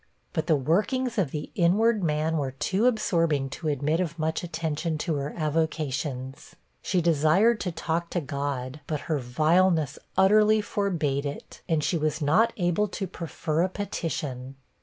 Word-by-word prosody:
But 160 Hz, -1 st, -1 dB
the 160 Hz, -, +4 dB
workings 215 Hz, -, 0 dB
of 175 Hz, -8 st, +1 dB
the 150 Hz, +1 st, -5 dB
inward 210 Hz, +5 st, +3 dB
man 155 Hz, 0 st, 0 dB
were 135 Hz, -3 st, -2 dB
too 195 Hz, -, +1 dB
absorbing 165 Hz, -, +1 dB
to 160 Hz, -, -5 dB
admit 150 Hz, +2 st, 0 dB
of 170 Hz, -2 st, -2 dB
much 160 Hz, 0 st, -1 dB
attention 160 Hz, -1 st, -2 dB
to 165 Hz, +2 st, -2 dB
her 140 Hz, +1 st, -3 dB
avocations. 150 Hz, -4 st, -2 dB, 0.3 s
She 180 Hz, -, 0 dB
desired 170 Hz, +8 st, +3 dB
to 180 Hz, -, -2 dB
talk 165 Hz, +1 st, -2 dB
to 175 Hz, -, -1 dB
God, 140 Hz, -2 st, -4 dB
but 150 Hz, -3 st, -2 dB
her 155 Hz, -3 st, -1 dB
vileness 155 Hz, +4 st, +2 dB, 0.2 s
utterly 215 Hz, +2 st, +5 dB
forbade 165 Hz, -10 st, -1 dB
it, 140 Hz, -, -8 dB
and 160 Hz, -2 st, +1 dB
she 170 Hz, -, 0 dB
was 155 Hz, 0 st, 0 dB
not 160 Hz, +10 st, +3 dB
able 175 Hz, +2 st, +1 dB
to 195 Hz, 0 st, -4 dB
prefer 165 Hz, -2 st, -3 dB
a 185 Hz, -, +2 dB
petition. 145 Hz, -9 st, -4 dB
160 Hz, 160 wpm, -26 LUFS, 145-185 Hz, 0.3 s, utterly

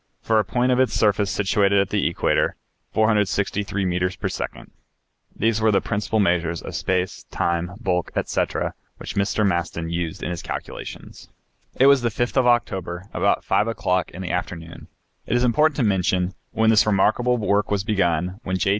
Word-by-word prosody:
For 110 Hz, -1 st, +3 dB
a -, -, +2 dB
point 120 Hz, +6 st, 0 dB
of 125 Hz, -, +2 dB
its 130 Hz, -, +2 dB
surface 105 Hz, -1 st, +2 dB
situated 100 Hz, 0 st, +2 dB
at 100 Hz, -1 st, +1 dB
the 105 Hz, -1 st, +1 dB
equator, 85 Hz, -, +1 dB, 0.4 s
463 105 Hz, -2 st, +1 dB
meters 90 Hz, +1 st, 0 dB
per -, -, -3 dB
second. -, -, -6 dB, 0.6 s
These 110 Hz, 0 st, +1 dB
were 110 Hz, -, +4 dB
the 100 Hz, -2 st, +4 dB
principal 105 Hz, +2 st, -1 dB
measures 85 Hz, -4 st, +1 dB
of -, -, -7 dB
space, 90 Hz, 0 st, -1 dB
time, 85 Hz, +1 st, -1 dB
bulk, 90 Hz, -6 st, -1 dB
etc., -, -, -1 dB, 0.2 s
which -, -, -7 dB
Mr. 100 Hz, +2 st, +1 dB
Maston 85 Hz, -3 st, -1 dB
used 85 Hz, -2 st, -3 dB
in -, -, -2 dB
his 85 Hz, -, -4 dB
calculations. -, -, -8 dB, 0.5 s
It 130 Hz, -, +4 dB
was 140 Hz, -1 st, +6 dB
the 120 Hz, -, +1 dB
5th 120 Hz, +3 st, -2 dB
of 130 Hz, -1 st, +4 dB
October, 95 Hz, -6 st, 0 dB
about -, -, +1 dB
5 105 Hz, -, +2 dB
o'clock 95 Hz, -5 st, 0 dB
in 95 Hz, -, -8 dB
the 90 Hz, -, -3 dB
afternoon, 85 Hz, -2 st, -5 dB, 0.4 s
it -, -, 0 dB
is 120 Hz, -, +1 dB
important 150 Hz, +5 st, +3 dB
to 135 Hz, -, 0 dB
mention, 95 Hz, -2 st, +1 dB, 0.2 s
when 110 Hz, 0 st, +2 dB
this 110 Hz, -1 st, +4 dB
remarkable 110 Hz, +5 st, +2 dB
work 105 Hz, -2 st, +1 dB
was 100 Hz, -2 st, 0 dB
begun, 90 Hz, -3 st, 0 dB
when 95 Hz, -3 st, -2 dB
J. 95 Hz, -, 0 dB
100 Hz, 180 wpm, -23 LUFS, 90-110 Hz, 0.6 s, was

